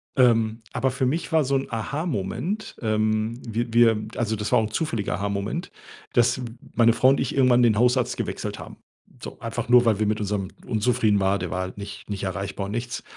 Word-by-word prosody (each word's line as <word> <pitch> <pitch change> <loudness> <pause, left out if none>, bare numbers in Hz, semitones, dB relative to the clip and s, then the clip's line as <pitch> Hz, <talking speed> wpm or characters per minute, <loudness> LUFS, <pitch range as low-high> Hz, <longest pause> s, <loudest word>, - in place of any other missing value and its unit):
Ähm, 115 -3 +3
aber 130 - 0
für 130 +1 -1
mich 160 +7 -1
war 160 -3 +3
so 135 +1 +1
'n 135 - -1
Aha-Moment 150 - -3
ähm, 110 +1 0
wir 115 +1 -2
wir 115 -2 +4
also, 110 -2 0
das 105 0 -4
war 125 - +5
auch - - +1
'n 110 - -4
zufälliger 110 -7 -1
Aha-Moment, 100 - -3 0.4
dass 120 +1 +3 0.3
meine 115 -1 +5
Frau 130 - +4
und 135 - +3
ich 130 - -2
irgendwann 125 -2 +4
den 110 -3 +4
Hausarzt 125 +2 +2
gewechselt - - -4
haben. - - -10 0.4
So, - - -8
einfach - - -4
nur, 125 0 +6
weil 110 -3 +2
wir 110 - +2
mit 105 0 0
unserem 100 -2 -2 0.2
unzufrieden 110 -2 +2
war. 100 +1 +1
Der 90 -1 -4
war 90 - -1
halt 95 +1 -6
nicht 100 0 -9
nicht 100 -1 -4
erreichbar 100 +1 -3
und 100 - -6
nichts. 120 +2 -4
115 Hz, 205 wpm, -24 LUFS, 105-125 Hz, 0.4 s, nur